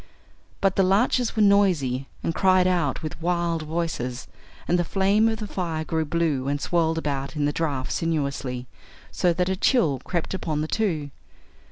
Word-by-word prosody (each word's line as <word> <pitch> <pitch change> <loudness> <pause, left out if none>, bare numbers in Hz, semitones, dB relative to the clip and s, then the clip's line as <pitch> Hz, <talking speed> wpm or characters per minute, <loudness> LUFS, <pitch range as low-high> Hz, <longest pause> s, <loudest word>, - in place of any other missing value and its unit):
But 195 -1 +2
the - - +5
larches 225 +5 +2
were 215 - +3
noisy 170 -11 +3 0.2
and 165 - 0
cried 185 0 +4
out 175 -7 0
with 155 +1 -6
wild 170 -1 0
voices, 155 -6 -3 0.4
and 175 - +2
the - - +2
flame 200 +5 +2
of 220 - -2
the 215 - -5
fire 170 -5 -3
grew 160 0 -1
blue 150 -4 0
and 145 +1 0
swirled 165 0 +1
about 140 -2 -3
in 150 -1 0
the 145 - 0
draught 140 -6 -2
sinuously, 140 -6 -2 0.5
so 180 - +2
that 180 +1 0
a 190 - 0
chill 180 - +2
crept 175 0 -3
upon 155 -5 -2
the 155 - -2
two. 160 -9 -1
165 Hz, 175 wpm, -24 LUFS, 145-185 Hz, 0.5 s, the